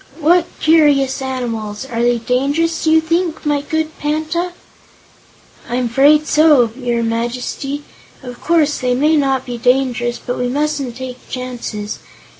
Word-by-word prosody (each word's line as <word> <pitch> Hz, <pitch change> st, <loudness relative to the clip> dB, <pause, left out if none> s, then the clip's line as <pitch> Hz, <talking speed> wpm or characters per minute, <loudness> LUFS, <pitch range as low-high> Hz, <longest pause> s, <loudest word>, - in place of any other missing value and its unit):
"What 340 Hz, +2 st, +3 dB
curious 290 Hz, -4 st, +3 dB
animals! 235 Hz, -4 st, -4 dB
Are 235 Hz, -3 st, -3 dB
they 240 Hz, 0 st, +2 dB
dangerous, 285 Hz, +8 st, 0 dB
do -, -, +3 dB
you 320 Hz, 0 st, +5 dB
think, 330 Hz, 0 st, -1 dB
my 295 Hz, -1 st, +1 dB
good 315 Hz, +1 st, -3 dB
Panta?" 315 Hz, +4 st, -1 dB, 1.2 s
"I'm 245 Hz, 0 st, 0 dB
'fraid 290 Hz, +5 st, +4 dB
so, 300 Hz, -7 st, +4 dB
your 240 Hz, -3 st, -1 dB
Majesty. 245 Hz, +5 st, -3 dB, 0.4 s
Of 245 Hz, -1 st, -9 dB
course, 310 Hz, -3 st, +2 dB
they 250 Hz, -1 st, 0 dB
may 300 Hz, +5 st, +3 dB
not 270 Hz, -3 st, +1 dB
be 245 Hz, -1 st, -6 dB
dangerous, 245 Hz, -1 st, +1 dB
but 245 Hz, -, -5 dB
we 250 Hz, -, 0 dB
mustn't 285 Hz, -2 st, -2 dB
take 255 Hz, 0 st, -8 dB
chances. 240 Hz, -5 st, -5 dB
270 Hz, 140 wpm, -17 LUFS, 245-305 Hz, 1.2 s, you